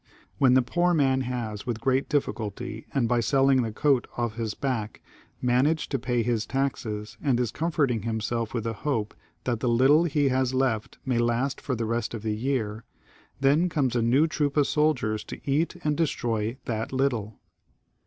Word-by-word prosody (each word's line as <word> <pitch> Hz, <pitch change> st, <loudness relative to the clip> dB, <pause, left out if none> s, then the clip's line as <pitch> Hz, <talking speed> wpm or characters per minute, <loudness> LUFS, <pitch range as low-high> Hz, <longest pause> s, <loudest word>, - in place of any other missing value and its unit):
When 130 Hz, -2 st, +5 dB
the 130 Hz, -, +5 dB
poor 175 Hz, +6 st, +1 dB
man 135 Hz, -3 st, +3 dB
has 110 Hz, -4 st, -4 dB
with 115 Hz, -2 st, -2 dB
great 130 Hz, +3 st, +1 dB
diflSculty, 110 Hz, -6 st, -2 dB
and 130 Hz, -4 st, +1 dB
by 120 Hz, 0 st, +2 dB
selling 135 Hz, +2 st, +3 dB
the 115 Hz, -2 st, -2 dB
coat 135 Hz, +2 st, +2 dB
off 120 Hz, -2 st, -1 dB
his 110 Hz, -2 st, -3 dB
back, 120 Hz, -6 st, -3 dB, 0.4 s
man 125 Hz, +3 st, +3 dB
aged 160 Hz, 0 st, -1 dB
to 135 Hz, -, 0 dB
pay 120 Hz, -1 st, 0 dB
his 115 Hz, -2 st, -1 dB
taxes, 115 Hz, -6 st, -3 dB
and 130 Hz, -5 st, +1 dB
is 120 Hz, -3 st, 0 dB
comforting 150 Hz, -8 st, 0 dB
himself 115 Hz, +2 st, -2 dB
with 120 Hz, -4 st, -2 dB
the 115 Hz, 0 st, -2 dB
hope 110 Hz, -2 st, -2 dB, 0.3 s
that 120 Hz, -3 st, -1 dB
the 125 Hz, -, 0 dB
little 135 Hz, +8 st, +5 dB
he 145 Hz, -3 st, +2 dB
has 130 Hz, 0 st, +1 dB
left 130 Hz, -5 st, 0 dB
may 125 Hz, -3 st, +1 dB
last 120 Hz, +3 st, 0 dB
for 130 Hz, -, -2 dB
the 115 Hz, 0 st, -2 dB
rest 115 Hz, +1 st, -2 dB
of 110 Hz, -, -7 dB
the 110 Hz, -1 st, -1 dB
year, 115 Hz, -3 st, -2 dB, 0.6 s
then 150 Hz, +6 st, +4 dB
comes 135 Hz, -7 st, 0 dB
a 120 Hz, -, +2 dB
new 125 Hz, +7 st, +4 dB
troop 150 Hz, -3 st, -1 dB
of 145 Hz, -, +5 dB
soldiers 135 Hz, -7 st, +1 dB
to -, -, -8 dB
eat 150 Hz, +6 st, +1 dB
and 150 Hz, -1 st, 0 dB
destroy 115 Hz, -7 st, -1 dB
that 110 Hz, -2 st, -3 dB
little. 125 Hz, -6 st, -1 dB
125 Hz, 185 wpm, -26 LUFS, 115-140 Hz, 0.6 s, When